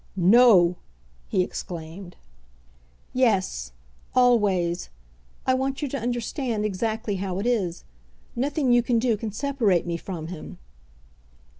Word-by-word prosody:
"No!" 190 -2 +6 0.5
he 185 - +2
exclaimed. 175 +1 -7 1.0
"Yes; 195 - +1 0.4
always. 200 -9 +2 0.6
I 260 - +3
want 265 +2 -1
you - - 0
to 275 - -3
understand 240 -1 -2
exactly 215 +1 -2
how 185 -1 -3
it 200 - -3
is. 200 -9 0 0.5
Nothing 275 +1 0
you 240 - +5
can 235 0 +1
do 230 -1 +2
can 215 +1 -5
separate 225 - +1
me 170 -1 -2
from 165 -3 -6
him." 175 -3 -8
215 Hz, 120 wpm, -25 LUFS, 180-245 Hz, 1.0 s, No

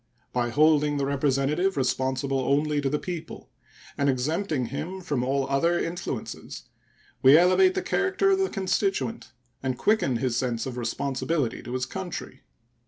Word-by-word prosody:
By 120 -1 0
holding 150 +2 +3
the 140 - 0
representative 140 +6 +1
responsible 130 +1 0
only 145 +3 +1
to 140 - 0
the 150 - 0
people, 175 0 -7 0.5
and 140 0 +3
exempting 145 +2 0
him 155 +9 -5
from 145 -8 -2
all 135 +1 0
other 165 +6 +2
influences, 170 +1 -5 0.6
we 135 +3 +8
elevate 275 - +5
the 380 - -1
character 390 0 +1
of 385 - +3
the 385 - +1
constituent 195 - -1 0.3
and 130 -2 -2
quicken 210 - +2
his 120 0 -1
sense 120 -2 -1
of 130 -2 -5
responsibility 130 +3 -2
to 120 - -7
his 130 -1 -1
country. 175 -7 -6
145 Hz, 150 wpm, -26 LUFS, 130-175 Hz, 0.6 s, we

